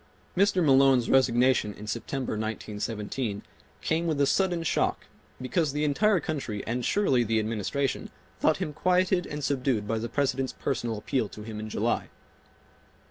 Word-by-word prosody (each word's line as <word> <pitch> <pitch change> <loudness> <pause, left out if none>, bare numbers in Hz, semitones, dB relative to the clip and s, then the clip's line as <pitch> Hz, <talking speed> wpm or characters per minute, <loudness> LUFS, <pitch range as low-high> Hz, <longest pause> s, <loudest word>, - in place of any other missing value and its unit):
Mr. 190 -2 +3
Malone's 135 -3 +5
resignation 125 -4 +3
in 105 - -9
September, 120 +4 -3
1917, 110 0 -3 0.4
came 165 +2 0
with 155 -3 0
a 140 - +4
sudden 175 +2 +1
shock, 165 - 0 0.3
because 140 +3 0
the 150 +1 -1
entire 190 +7 +3
country 135 -10 -4
and 120 +2 -2
surely 135 -11 +2
the 115 0 0
Administration 115 +5 -1 0.3
thought - - +3
him 150 - -3
quieted 180 +2 +2
and 150 0 -5
subdued 130 -6 0
by 110 +1 0
the 115 +1 -4
President's 135 0 0
personal 120 -4 -2
appeal 110 0 -1
to 105 - -10
him 110 -1 -6
in 110 0 -5
July. - - -1
130 Hz, 150 wpm, -27 LUFS, 110-150 Hz, 0.4 s, Malone's